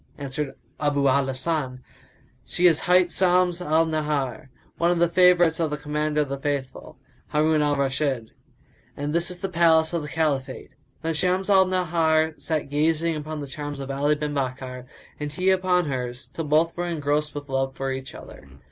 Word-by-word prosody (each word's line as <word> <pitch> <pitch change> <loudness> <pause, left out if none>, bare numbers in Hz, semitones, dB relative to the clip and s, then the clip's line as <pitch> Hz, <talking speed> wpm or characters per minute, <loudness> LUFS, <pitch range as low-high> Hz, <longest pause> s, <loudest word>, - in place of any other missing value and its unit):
Answered 140 0 -4 0.2
Abu 145 -2 +1
al 135 +1 +3
Hasan, 130 -1 -2 0.6
"She 180 - 0
is 165 -3 +6
hight 180 0 +3
Shams 180 -1 +2
al 160 -1 +2
Nahar, 150 -6 -2 0.3
one 170 - +3
of 175 - +2
the 170 +1 +4
favourites 175 -1 +4
of 165 -2 +1
the 150 - -3
Commander 150 0 -1
of 145 - -2
the 140 0 -4
Faithful, 140 -2 -4 0.3
Harun 155 0 +2
al 145 -1 +2
Rashid, 135 -4 -1 0.7
and 145 +1 -3
this 170 +1 +1
is 180 - -4
the 195 - -3
palace 165 -2 +3
of 170 - 0
the 150 - -6
Caliphate." 140 -6 -2 0.3
Then 165 0 0
Shams 185 +5 0
al 190 -1 +6
Nahar 160 -3 +1
sat 155 -3 -2
gazing 160 +2 +1
upon 155 0 -5
the 140 - -6
charms 145 +1 -6
of 135 0 -5
Ali 145 +2 +1
bin 150 0 -3
Bakkar 130 -2 -4 0.3
and 150 -1 -4
he 185 +5 +1
upon 185 -2 +2
hers, 125 -3 -4
till 165 - -5
both 155 +3 +2
were 175 0 -2
engrossed 150 -2 -1
with 145 0 -6
love 135 -1 -1
for 135 0 -3
each 130 0 -6
other. 70 - -12
150 Hz, 185 wpm, -24 LUFS, 140-170 Hz, 0.7 s, is